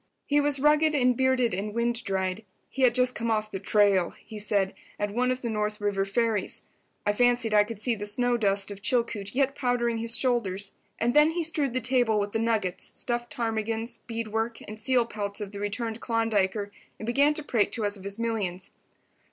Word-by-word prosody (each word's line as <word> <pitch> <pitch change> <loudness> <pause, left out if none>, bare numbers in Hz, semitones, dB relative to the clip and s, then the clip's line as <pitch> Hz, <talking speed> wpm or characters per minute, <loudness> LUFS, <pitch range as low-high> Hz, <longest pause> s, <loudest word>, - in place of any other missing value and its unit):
He 290 0 +3
was 285 -1 +1
rugged 300 +2 +4
and 250 -3 +3
bearded 260 -3 +2
and 205 +3 -3
wind 235 0 0
dried. 190 +1 -2 0.3
He 270 - -4
had 245 -2 +5
just 250 0 +4
come 230 -1 -3
off 215 -1 0
the 195 - -4
"trail," 200 -3 +3
he 215 - -10
said, 200 -2 +1 0.2
at 205 -1 -2
one 250 +2 +1
of 255 0 -1
the 235 - -1
North 210 0 -2
River 200 -2 0
ferries. 220 0 -1 0.4
I 205 - +2
fancied 245 -1 +2
I 210 -1 +6
could 215 0 -7
see 240 +2 +1
the 205 -2 -4
snow 245 +3 +1
dust 200 -3 +1
of 200 0 -8
Chilcoot 230 -3 -1
yet 275 0 +2
powdering 245 -3 0
his 230 0 +2
shoulders. 205 -6 0 0.3
And 240 +1 +1
then 300 +2 +6
he 340 +1 -1
strewed 300 -5 0
the 255 - 0
table 235 -2 +2
with 205 0 -2
the 225 - -1
nuggets, 220 -5 0
stuffed 240 0 -2
ptarmigans, 225 0 -2
bead 230 -1 -4
work 225 +2 -2
and 215 +1 -5
seal 245 +1 +2
pelts 205 -2 -4
of 205 -2 -5
the 200 - -7
returned 220 +2 -3
Klondiker, 210 -3 0 0.3
and 220 - -7
began 280 +5 +3
to 310 - -3
prate 230 -7 +1
to 225 -3 -1
us 205 0 -1
of 195 - -12
his 200 +1 -3
millions. 205 -6 -3
225 Hz, 210 wpm, -27 LUFS, 205-245 Hz, 0.4 s, I